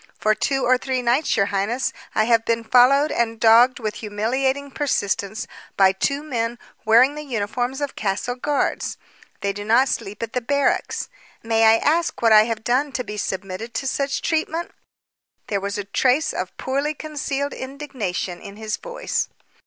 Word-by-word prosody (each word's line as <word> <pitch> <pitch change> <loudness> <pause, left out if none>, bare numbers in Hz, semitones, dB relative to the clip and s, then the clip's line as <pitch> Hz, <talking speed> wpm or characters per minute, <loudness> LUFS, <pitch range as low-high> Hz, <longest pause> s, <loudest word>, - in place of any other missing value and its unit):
For 215 - +2
two 270 +4 0
or 255 0 +4
three 260 -1 -2
nights, 245 +6 +2
your 195 - +4
highness, 205 +6 -1 0.2
I 215 - +4
have 230 0 +3
been 230 0 0
followed 265 +6 +5
and 230 -1 -1
dogged 235 +3 +6
with 215 -2 -3
humiliating 260 +7 -1
persistence 215 -7 -1 0.3
by 190 -1 +6
two 275 +9 -1
men 235 -5 -2 0.3
wearing 235 +6 +6
the 300 - -6
uniforms 245 +2 -2
of 285 -1 -3
castle 205 +4 -2
guards. 280 +3 -1 0.4
They 200 -1 -1
do 205 +1 -6
not 235 +5 +4
sleep 205 +3 -4
at 230 - -5
the 250 - -1
barracks. 280 - 0 0.4
May 225 0 +3
I 220 0 +7
ask 325 +6 +1
what 230 -1 +3
I 215 0 +8
have 225 -1 -3
done 265 +5 +1
to 250 - -2
be 210 - -7
submitted 195 +3 -4
to 270 - -2
such 275 +1 -1
treatment?" 320 +1 -1 0.8
There 200 -2 0
was 200 +1 -3
a 205 - -3
trace 255 +8 +1
of 185 0 -5
poorly 280 +3 -1
concealed 285 -2 -3
indignation 260 -10 -5
in 200 - -10
his 215 0 -4
voice. - - -3
240 Hz, 170 wpm, -22 LUFS, 215-275 Hz, 0.8 s, I